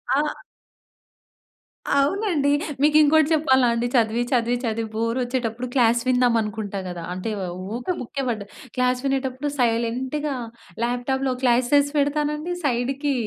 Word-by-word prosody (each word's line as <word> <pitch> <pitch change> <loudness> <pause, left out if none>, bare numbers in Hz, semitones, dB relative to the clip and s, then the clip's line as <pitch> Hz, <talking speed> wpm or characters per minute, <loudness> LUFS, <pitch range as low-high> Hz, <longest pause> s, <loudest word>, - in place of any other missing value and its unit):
ఆ! 285 - +3 1.7
అవునండి. 295 +1 +2 0.3
మీకు 300 +1 +5
ఇంకోటి 310 0 +5
చెప్పాలా 265 -5 +4
అండి? 235 +1 -1
చదివి, 230 0 +2
చదివి, 240 0 +2
చదివి 225 -1 -2
బోర్ 230 +2 -1
ఒచ్చేటప్పుడు 245 -1 -2
క్లాస్ 235 -2 +3
విందాం 250 -2 +3
అనుకుంటా 210 -1 -4
గద. 175 -1 -6
అంటే 185 +4 -4 0.5
ఊకే 250 +10 -2
బుక్కె 275 +3 -4
పడ్డ 220 -3 -2 0.3
క్లాస్ 250 0 +1
వినేటప్పుడు 270 +1 -1
సైలెంట్‌గా 250 +5 0 0.5
ల్యాప్టాప్‌లో 255 +2 0
క్లాసస్ 255 +4 +3
పెడతానండి 300 +3 0
సైడ్‌కి 275 +2 0
255 Hz, 120 wpm, -23 LUFS, 235-285 Hz, 1.7 s, మీకు